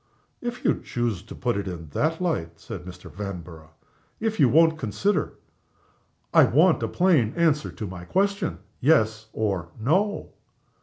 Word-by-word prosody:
"If 245 0 -5
you - - +2
choose 120 -7 -2
to - - -11
put 120 -4 -1
it 100 -1 -3
in 85 -4 -6
that 155 - 0
light," 160 - -2
said 95 -7 -8
Mr. 90 -1 -10
Vanborough; 90 -5 -7 0.5
"if 220 -1 -2
you 135 - +6
won't 160 +3 +4
consider 185 - 0 0.5
" - - -40
"I - - +8
want - - +4
a - - 0
plain 160 - +3
answer 160 -3 +2
to 110 - -6
my 90 -2 -8
question 200 - 0 0.2
'yes, 110 -7 +2
or 95 -6 -2
no. 185 - +1
120 Hz, 155 wpm, -25 LUFS, -, 0.5 s, I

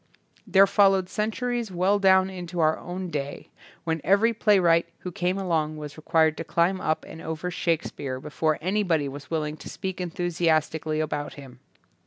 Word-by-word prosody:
There 195 0 +6
followed 195 -2 +3
centuries 235 +2 -2
well 185 +3 +2
down 190 -1 +5
into 180 -1 -6
our 155 -1 +3
own 180 0 -6
day, 145 -2 -5 0.3
when 160 -2 -2
every 210 +5 +3
play 210 -2 +3
wright 170 -2 +3
who 180 - -5
came 180 0 -1
along 160 -5 -1
was 150 -1 -7
required 160 0 +2
to - - -4
climb 170 +3 +1
up 155 - -1
and 160 - -10
over 160 +3 -4
Shakespeare 155 -6 -2
be 150 +3 -9
fore 155 0 +1
anybody 180 -5 +1
was 140 0 -9
willing 155 -2 -2
to - - -10
speak 190 -2 -5
en 180 - -3
thusiastically 160 -3 0
about 145 -1 -4
him. 130 -3 -12
170 Hz, 175 wpm, -25 LUFS, 155-190 Hz, 0.3 s, There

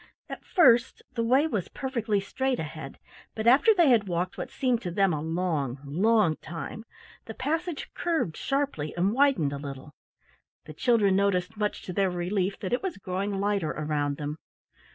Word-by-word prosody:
At - - -7
first 240 - +4
the 230 - -1
way 260 +6 +4
was 210 - -2
perfectly 235 -6 -1
straight 260 +6 -1
ahead, 155 -3 -7 0.4
but 220 - -3
after 265 - +6
they 345 -8 +4
had 225 -5 +4
walked 175 0 -2
what - - -5
seemed 250 -3 0
to 180 - -4
them 195 0 +2
a 150 - -2
long, 160 -5 -1
long 185 +3 +2
time, 175 +7 -7 0.4
the 220 - -8
passage 325 +4 -2
curved 325 - -1
sharply 275 - -2
and 190 +4 +2
widened 260 - +3
a 140 - -4
little. 140 0 -8 0.7
The 155 - -9
children 210 - +3
noticed, 195 0 +1
much 210 0 -2
to 180 - -6
their 195 +1 +2
relief, 185 +2 -1
that 190 - -3
it 245 - +1
was 380 -3 -4
growing 195 +1 -3
lighter 200 -5 0
around 145 -2 -2
them. 150 +1 -4
200 Hz, 175 wpm, -27 LUFS, 165-240 Hz, 0.7 s, after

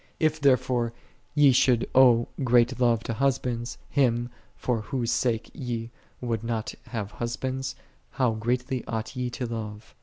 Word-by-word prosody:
If 155 -1 +1
therefore 125 -3 +2 0.4
ye 145 -2 +7
should 125 -1 +3
owe 120 -3 +6 0.2
great 125 0 +3
love 120 -2 +3
to 115 - -3
husbands, 125 -2 -1
Him, 120 -3 +1 0.2
for 120 -3 -1
Whose 120 +2 -2
sake 120 -2 0
ye 120 -2 -4 0.3
would 115 -3 -2
not 115 -2 -2
have 110 -4 -4
husbands, 130 +3 -3 0.3
how 125 - +1
greatly 125 +3 -1
ought 110 -1 -4
ye 125 -1 -1
to 125 +1 -4
love 110 -2 -6
120 Hz, 145 wpm, -27 LUFS, 115-130 Hz, 0.4 s, ye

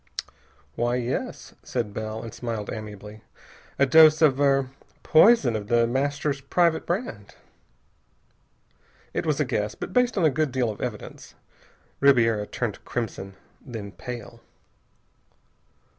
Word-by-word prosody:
"Why, 120 +8 0
yes," 125 0 -4
said 115 -5 -3
Bell, 110 +1 -5
and 115 - -8
smiled 115 -4 -5
amiably. 105 0 -9 0.6
"A 140 - +4
dose 155 +2 +7
of 140 -3 +4
er 135 -2 +2 0.3
poison 160 - +5
of 105 -1 -4
The 115 +1 +3
Master's 140 +3 -1
private 165 +3 +1
brand." 195 +9 -4 1.8
It - - -2
was - - +1
a - - +2
guess, - - -2
but - - -7
based 250 -3 +2
on 180 - +3
a 155 - +4
good 155 0 0
deal 125 -3 0
of 105 - -10
evidence. 120 -4 -7 0.6
Ribiera 115 -6 +3
turned 115 -4 -4
crimson, 100 -5 -5 0.3
then 110 -6 -7
pale. 120 +4 -9
125 Hz, 130 wpm, -25 LUFS, 110-145 Hz, 1.8 s, dose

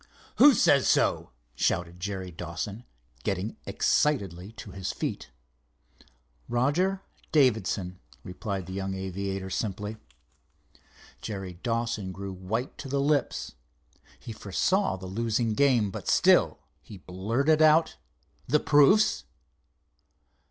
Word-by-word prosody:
"Who 285 -3 +8
says 140 -2 +4
so?" - - +2 0.2
shouted 85 +6 -1
Jerry 95 -1 -4
Dawson, 90 +7 -6 0.4
getting 100 +3 -2
excitedly 100 - 0
to 110 -2 -10
his 95 0 -4
feet. - - -4 1.2
"Roger 170 +11 +1 0.3
Davidson," 105 - +1 0.2
replied 95 0 -5
the 95 - -8
young 95 0 -3
aviator, 95 0 -4
simply. 105 +3 -3 1.2
Jerry 95 -4 -5
Dawson 115 -5 -2
grew 95 +1 -6
white 110 +8 -4
to 135 - -7
the 140 +1 0
lips. 140 -1 0 0.7
He 115 - -8
foresaw 170 - 0
the 95 0 -9
losing 115 +3 -1
game, 120 -5 +3
but - - -8
still - - +4 0.2
he 100 +7 -12
blurted 115 - 0
out: 155 +1 +4 0.5
"The 150 +4 +3
proofs?" 145 - +4
105 Hz, 110 wpm, -27 LUFS, 95-135 Hz, 1.2 s, Who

